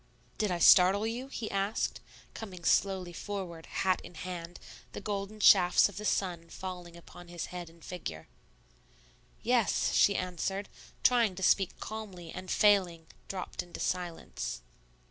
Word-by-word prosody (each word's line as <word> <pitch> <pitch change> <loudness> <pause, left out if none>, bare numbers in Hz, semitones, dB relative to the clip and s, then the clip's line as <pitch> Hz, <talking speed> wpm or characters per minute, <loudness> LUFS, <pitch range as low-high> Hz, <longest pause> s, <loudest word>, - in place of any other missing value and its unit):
"Did 210 - +1
I 180 - 0
startle 185 +4 +7
you?" 240 +4 -3
he 235 -5 -5
asked, 195 +2 -1 0.3
coming 185 -6 -8
slowly 185 -1 +1
forward, 175 -4 -6
hat 185 -1 0
in 175 - -12
hand, 175 0 -6 0.3
the - - -5
golden 205 +1 -4
shafts 185 -2 +6
of 205 - -12
the 210 - -5
sun 175 -5 -1
falling 180 -2 -7
upon 175 +1 -13
his 175 -1 -5
head 175 -2 -6
and 165 0 -17
figure. 80 - -6 1.2
"Yes," 235 -3 +2
she 200 - +5
answered, 185 +2 -2 0.3
trying 235 -6 +4
to 190 - -6
speak 190 +1 +3
calmly, 195 -6 -7
and 185 0 -8
failing, 185 -6 +3 0.2
dropped 185 -2 -4
into 175 - -10
silence. 175 -2 -3
185 Hz, 145 wpm, -31 LUFS, 175-205 Hz, 1.2 s, startle